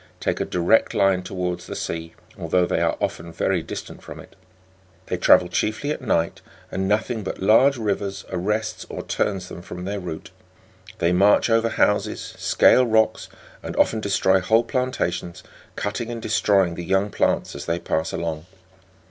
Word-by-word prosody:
take - - -1
a - - 0
direct 90 +6 +2
line 95 -2 +3
towards 90 -1 -4
the - - -6
sea, 80 0 -5 0.2
although 90 +2 +1
they - - -1
are - - +1
often 85 +1 -3
very - - 0
distant - - -8
from - - -10
it. - - -14 0.7
They - - -2
travel 90 - +5
chiefly 110 +10 -1
at 150 - -4
night, 85 -9 0 0.3
and 95 0 -2
nothing 110 +3 0
but 95 - -5
large 125 +8 +4
rivers 100 -3 -3
arrests 105 +4 -2
or - - -6
turns 95 -3 -2
them 85 - -9
from 90 0 -8
their 100 +1 -3
route; 85 -4 -7 0.7
they 85 - +1
march 100 +5 +4
over 115 0 +3
houses, 105 -2 0
scale 125 -1 +4
rocks, 110 -1 +1 0.3
and - - -6
often 110 - +2
destroy 95 -2 +2
whole 110 +5 +3
plantations, 125 -9 -2 0.3
cutting 115 +3 -3
and 120 -1 -4
destroying 100 -5 +2
the 85 - -6
young 95 +3 +1
plants - - 0
as 70 - -8
they 85 0 0
pass 80 -2 -2
along. 80 0 -4
95 Hz, 165 wpm, -23 LUFS, 90-110 Hz, 0.7 s, travel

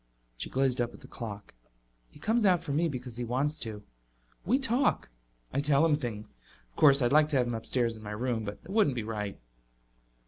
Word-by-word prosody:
She - - -5
gazed 130 -2 +1
up 120 - -2
at - - -15
the - - -12
clock. 105 -3 -8 0.6
"He - - -17
comes 225 +1 +1
out 180 -4 +4
for 155 - -4
me 160 +4 +2
because 125 -4 -6
he 125 - -2
wants 140 +6 -1
to. 110 -5 -5 0.6
We 245 +6 +4
talk; 265 - +1 0.4
I 140 - +1
tell 145 +1 +3
him 155 -2 +4
things. 110 - -6 0.3
Of - - -34
course, 140 -2 +6
I'd 120 - +2
like 155 0 +5
to 145 - +1
have 125 - +3
him 120 - -3
upstairs 115 0 -1
in - - -12
my 105 - -8
room, 115 +1 -2
but 105 0 -5
it 175 - -10
wouldn't 200 - +3
be 120 - -2
right." 105 -2 -4
125 Hz, 215 wpm, -30 LUFS, 110-150 Hz, 0.6 s, course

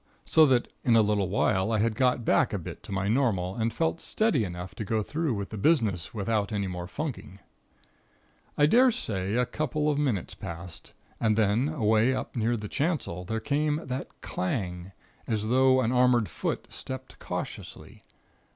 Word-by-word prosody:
So 155 -1 +6
that, 125 -3 +2 0.2
in 120 - +4
a 110 - +6
little 105 -3 +1
while, 100 +1 +1
I 110 - +2
had 110 +1 +1
got 125 0 +1
back - - +3
a - - 0
bit - - -8
to - - -11
my 100 +1 -1
normal, 105 -6 +1
and 115 0 0
felt 165 +3 -1
steady 215 - +1
enough 90 -1 -6
to - - -5
go 110 +1 0
through 155 0 -1
with 100 -1 -4
the 110 - -5
business 105 - +1
without 105 -1 -1
any 100 -2 -1
more 90 -2 -5
funking. 130 - -5 1.2
"I 145 - +5
daresay 150 - +2
a 125 +1 +3
couple 150 +3 -1
of 145 - -1
minutes 125 - -1
passed, 85 0 -9 0.3
and 110 -2 +2
then, 110 +6 +2
away 115 -3 +2
up - - -5
near 115 0 +1
the 105 -1 -6
chancel, 140 - -2
there 110 +4 -2
came 150 +4 0
again 160 - -8
that 130 +2 -5
clang, 90 -2 -3 0.4
as 110 -2 -1
though 130 +1 +4
an 120 -1 +1
armored 125 -3 +3
foot - - -3
stepped 130 0 -7
cautiously. - - -7
115 Hz, 180 wpm, -28 LUFS, 100-130 Hz, 1.2 s, So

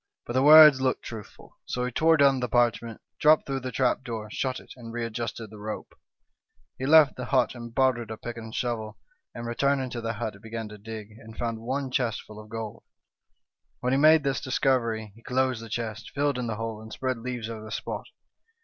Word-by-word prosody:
But 120 - -5
the 130 - +3
words 150 -1 +9
looked 130 -1 0
truthful; 110 -3 -10
so 125 0 -2
he 125 - -3
tore 160 +5 +4
down 140 -2 +5
the 125 -1 -2
parchment, 115 -1 +1 0.2
dropped 155 +1 +5
through 135 -1 -2
the 130 -1 -5
trap 130 0 +1
door, 110 -3 -5
shut 130 +2 -2
it, - - -13
and 115 -2 -10
readjusted 115 -1 -4
the 105 - -11
rope. 105 +1 -6 0.9
He 130 - -2
left 155 -3 +7
the 125 - -4
hut 125 -2 +2
and 120 -1 -8
borrowed 125 -3 +1
a 110 - -5
pick 120 +1 -6
and 110 -1 -8
shovel, 110 -3 -3 0.4
and 120 - -6
returning 130 +2 0
to 120 - -4
the 115 0 -2
hut, 110 0 -4
he 100 - -15
began 115 +1 -6
to 105 0 -11
dig, 110 0 -8
and 110 -1 -13
found 115 -2 -2
one 130 +3 -3
chest 125 -2 -1
full 105 0 -12
of 110 0 -12
gold. 110 -2 -6 1.0
When 125 +1 +1
he 135 - +3
made 155 +1 +6
this 135 -2 0
discovery 115 -5 0
he 115 - -17
closed 130 -1 0
the 115 - -9
chest, 110 -1 -4
filled 140 -2 +1
in 120 - -2
the 110 - -2
hole, 115 0 -5
and 110 0 -11
spread 130 -1 -2
leaves 120 -1 -4
over 110 -1 -7
the 110 - -9
spot. - - -4
120 Hz, 215 wpm, -27 LUFS, 110-130 Hz, 1.0 s, words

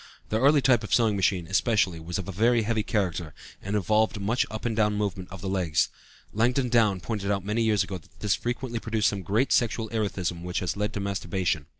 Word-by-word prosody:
The 110 - 0
early 140 +1 +5
type 120 -4 +4
of 105 - -7
sewing 115 -3 +3
machine, 95 -2 +1
especially, 95 -2 +1
was 85 +2 -4
of 95 - -4
very 115 +5 +2
heavy 110 0 0
character 90 - -2 0.3
and 100 +2 -3
involved 105 +2 +2
much 110 +6 0
up 110 +2 -6
and 115 -2 0
down 105 -1 +2
movement 100 -3 -3
of 95 -1 -8
the 95 - -4
legs; 90 -5 +1 0.4
Langdon 125 +4 +1
Down 110 -5 +3
pointed 105 -2 -3
out 100 -2 -1
many 105 +3 0
years 110 -4 +3
ago 95 -1 -6
that - - -24
this 105 -2 +1
frequently 120 -1 -3
produced 110 -2 +1
great 110 +10 +1
sexual 115 -1 +1
erethism 95 -6 -2
which 90 +1 -3
led 105 +1 -2
to - - -3
masturbation. 90 -5 -2
105 Hz, 205 wpm, -26 LUFS, 95-115 Hz, 0.4 s, early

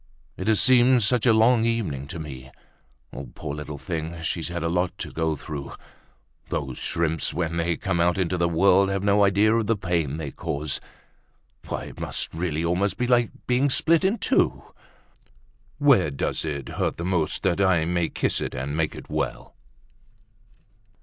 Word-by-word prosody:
It 95 - -5
has 110 -2 +4
seemed 125 -1 +5
such 125 +3 +2
a - - +7
long 115 +1 +4
evening 95 - -1
to 85 - -7
me! 65 -5 -8 0.9
Poor 75 -2 -5
little 75 0 -6
thing, 80 +2 -5
she's 85 -1 -2
had 85 -1 -4
a - - 0
lot 90 +2 -1
to - - -6
go 80 -1 -1
through! 70 -1 -7 0.8
Those 65 -2 -3
shrimps, 80 -2 0
when 85 -1 -2
they 85 0 0
come 85 - -1
out 90 +2 +2
into 90 -1 0
the 85 -1 +1
world, 95 +3 +4
have 100 0 -2
no 100 0 +4
idea 100 +2 +4
of 115 -2 0
the 115 - +2
pain 85 -7 -1
they 75 -4 -5
cause. 70 +2 -4 0.9
It - - -5
must - - -4
really 80 -1 -2
almost 90 +4 0
be 125 - 0
like 120 -1 +3 0.2
being 125 +3 +2
split 165 +5 +3
in 195 +5 +2
two. - - +1 1.1
Where 140 - +4
does 70 - -2
it 70 -4 -4
hurt - - -2
the 85 - -4
most, 90 -4 -1
that 95 -1 +1
I 90 -4 +3
may 85 0 0
kiss - - -1
it - - -4
and 70 +3 -3
make 80 -1 -1
it - - -10
well?" - - -4
85 Hz, 175 wpm, -24 LUFS, 80-105 Hz, 1.1 s, a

